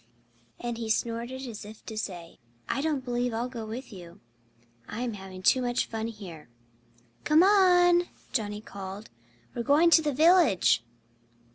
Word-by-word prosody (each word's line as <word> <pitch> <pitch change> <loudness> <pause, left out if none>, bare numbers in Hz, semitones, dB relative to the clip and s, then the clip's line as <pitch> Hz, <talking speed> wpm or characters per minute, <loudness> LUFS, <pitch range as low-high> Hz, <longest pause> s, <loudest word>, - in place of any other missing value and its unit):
And 240 -1 -4
he 225 -1 -4
snorted, 235 +4 -2
as 225 -4 -7
if 215 +1 -12
to 220 - -7
say, 180 -6 -6 0.3
"I 275 - -1
don't 290 -4 -1
believe 245 -1 -1
I'll 235 +2 -2
go 235 -3 -7
with 235 +2 -7
you. 175 -3 -12 0.7
I'm 235 +2 -4
having 190 -2 -10
too 255 - +4
much 245 0 0
fun 225 0 -4
here." 185 - -10 0.7
"Come 310 +3 +5
on!" 355 -3 +5 0.2
Johnnie 210 -3 -2
called. 200 0 -9 0.4
"We're - - -3
going 300 +7 +4
to 330 - +7
the 300 -2 -1
village." 310 - +4
235 Hz, 150 wpm, -28 LUFS, 210-280 Hz, 0.7 s, to